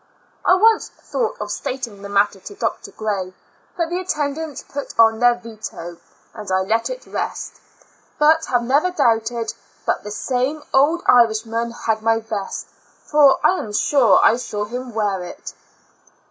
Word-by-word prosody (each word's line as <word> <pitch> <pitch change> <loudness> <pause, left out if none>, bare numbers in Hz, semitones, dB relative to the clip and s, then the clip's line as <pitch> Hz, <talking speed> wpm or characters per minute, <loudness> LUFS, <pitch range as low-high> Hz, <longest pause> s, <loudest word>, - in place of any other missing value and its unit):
I 365 - +5
once 440 +3 +4
thought 475 -3 -4
of - - -4
stating 240 -6 -5
the 200 - -8
matter 200 0 +2
to 405 - -10
Dr. 395 - -3
Gray, 195 -4 -3 0.4
but 335 -1 -1
the 355 - -1
attendants 300 -4 -3
put 285 0 -6
on 225 -1 +5
their 245 0 +5
veto, 220 -7 -8 0.4
and 210 -4 -7
I 185 0 +2
let 225 +4 0
it - - -7
rest, - - -5 0.6
but 315 +1 +4
have 245 -1 +1
never 285 +9 +2
doubted 230 -7 0 0.3
but - - 0
this 210 0 -6
same 270 +4 -1
old 305 +6 +3
Irishman 230 0 +3 0.2
had 220 -1 +1
my 225 0 +2
vest, 220 -3 -5 0.4
for 290 -3 +5
I 370 - +4
am 210 - -6
sure 265 +2 +4
I 230 - +5
saw 210 -4 -4
him 245 +1 -6
wear 200 -4 0
it. 175 - -9
235 Hz, 160 wpm, -21 LUFS, 215-290 Hz, 0.6 s, I